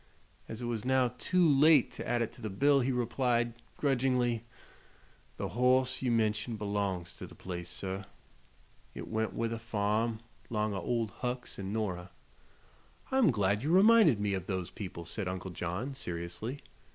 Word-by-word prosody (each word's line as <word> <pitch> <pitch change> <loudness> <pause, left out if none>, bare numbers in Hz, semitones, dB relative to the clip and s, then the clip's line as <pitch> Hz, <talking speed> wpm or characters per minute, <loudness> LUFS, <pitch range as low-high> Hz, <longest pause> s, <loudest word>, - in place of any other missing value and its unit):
As 115 +2 -6
it - - -2
was 115 -3 -2
now 130 -1 +2
too 180 +3 +3
late 145 -1 +6
to - - -6
add 120 -1 +1
it 115 - -4
to 120 - -15
the 110 - -3
bill 140 +8 +4
he 130 +1 +1
replied, 120 -1 +1 0.2
grudgingly: 125 -4 +1 0.9
"The - - -3
hoss 130 +2 +2
you 130 - 0
mention 110 0 +1
belongs 100 -4 -2
to - - -7
the - - -14
place, 85 -2 -6
sir. 95 +1 -4 0.9
It - - -6
went 110 0 -1
with 115 0 -1
the 115 - -3
farm, 110 +1 0 0.3
'long 105 -2 0
o' 95 - -3
Old 115 +1 -1
Hucks 125 -3 -3
an' 95 0 -4
Nora." 95 -5 -2 1.0
"I'm 265 -6 +5
glad 105 -4 +1
you 145 - -2
reminded 195 - +6
me 105 -1 0
of 95 -2 -3
those 95 -2 -3
people," 90 -5 -7
said 95 +3 -3
Uncle 95 0 -4
John, 90 +10 -3
seriously. 90 +5 -5
115 Hz, 165 wpm, -31 LUFS, 100-125 Hz, 1.0 s, late